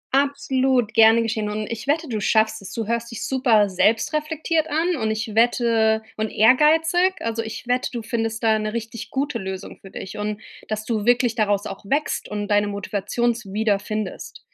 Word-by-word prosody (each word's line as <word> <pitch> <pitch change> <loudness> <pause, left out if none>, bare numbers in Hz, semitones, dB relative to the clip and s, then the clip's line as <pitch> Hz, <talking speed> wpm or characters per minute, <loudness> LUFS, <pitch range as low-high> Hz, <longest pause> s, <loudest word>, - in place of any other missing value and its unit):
Absolut 265 -4 +1
gerne 225 0 +6
geschehen. 220 -2 -2
Und 215 0 -3
ich 230 +4 -6
wette, 315 +2 +1
du 220 -4 -3
schaffst 220 0 +2
es. 190 - -9
Du 225 -2 -3
hörst 235 +1 -2
dich 230 - -5
super 240 -6 +3
selbstreflektiert 305 - 0
an 330 +4 +1
und 220 -2 -1
ich 220 0 -3
wette 225 -1 +2
und 220 0 -1
ehrgeizig. 320 - +4
Also 230 0 -2
ich 225 +2 -7
wette, 250 +1 0
du 235 -2 -5
findest 225 0 -3
da 220 -1 +3
'ne 215 +1 -3
richtig 230 0 -5
gute 270 -3 -2
Lösung 190 0 -7
für 195 - -12
dich 190 +2 -8
und 210 0 -3 0.3
dass 215 0 -4
du 220 -3 -2
wirklich 245 -1 +3
daraus 205 -3 0
auch 195 - -7
wächst 290 +8 -1
und 205 -1 -3
deine 205 0 +2
Motivations 205 +2 -2
wieder 210 -1 +1
findest. 215 -2 -5
225 Hz, 180 wpm, -22 LUFS, 215-255 Hz, 0.3 s, gerne